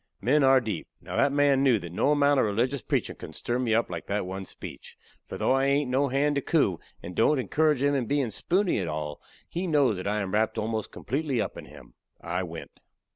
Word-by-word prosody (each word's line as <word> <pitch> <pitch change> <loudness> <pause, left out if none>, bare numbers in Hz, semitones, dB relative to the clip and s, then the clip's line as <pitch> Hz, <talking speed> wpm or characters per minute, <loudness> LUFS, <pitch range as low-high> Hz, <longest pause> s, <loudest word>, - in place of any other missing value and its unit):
Men 140 +7 +3
are 135 0 +6
deep. 110 -8 -4
Now - - -7
that 140 - +3
man 140 -1 +3
knew 130 -4 +4
that 85 -4 -7
no 135 - +1
amount 145 -1 +4
of - - +3
religious 120 +6 0
preachin' - - -2
could - - -9
stir 120 +1 -2
me 115 -3 +1
up 115 - +2
like 85 -2 -6
that 100 -1 -1
one 95 +1 -5
speech. - - -10 0.3
For - - -6
though - - +2
I 135 0 +2
hain't 140 -1 +1
no 135 +2 +2
hand 140 +3 +1
to - - +1
coo, 125 - +1 0.2
and 90 - -7
don't 140 - +3
encourage 145 +3 +1
him 145 0 +3
in 130 -5 0
bein' 140 -4 0
spoony 180 - +1
at 90 - -2
all, 75 -1 -4 0.3
he 180 +2 -3
knows 140 - +3
that 90 - -5
I 105 +1 0
am 95 -2 -4
wrapped 110 +1 +1
almost 110 -1 -2
completely 135 +1 -2
up - - -2
in - - -9
him. - - -15 0.3
I 90 +2 -3
went. 85 -2 -8
125 Hz, 235 wpm, -27 LUFS, 100-140 Hz, 0.3 s, are